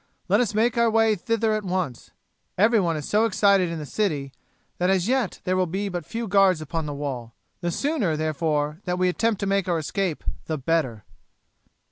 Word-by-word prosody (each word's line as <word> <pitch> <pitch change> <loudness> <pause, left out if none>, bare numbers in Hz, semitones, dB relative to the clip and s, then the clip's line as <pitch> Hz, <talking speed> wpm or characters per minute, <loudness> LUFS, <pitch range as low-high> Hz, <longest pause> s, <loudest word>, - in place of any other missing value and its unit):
"Let 200 +3 +3
us 225 -4 0
make 235 +2 +2
our 235 -1 +4
way 225 0 +3
thither 225 +1 0
at 215 0 -1
once. 180 -9 -3 0.5
Everyone 195 -5 +3
is 150 - -5
so 215 +2 +3
excited 200 -5 +3
in 165 - -4
the 150 - -5
city, 145 -7 -2 0.5
that, 180 +1 +2
as 190 -1 +2
yet, 255 -5 0
there 185 - 0
will 185 -1 +1
be 195 +4 -2
but 175 -5 -5
few 230 0 -4
guards 195 -3 +4
upon 155 +1 -4
the 145 - -4
wall. 130 -5 -5 0.2
The 175 - -2
sooner, 210 - 0
therefore, 155 0 -1
that 180 -1 -1
we 180 0 +2
attempt 220 +3 0
to - - 0
make 195 -1 +1
our 170 - +2
escape 175 +1 -2 0.2
the 155 - -2
better." 135 -6 -1
185 Hz, 195 wpm, -24 LUFS, 155-215 Hz, 0.5 s, our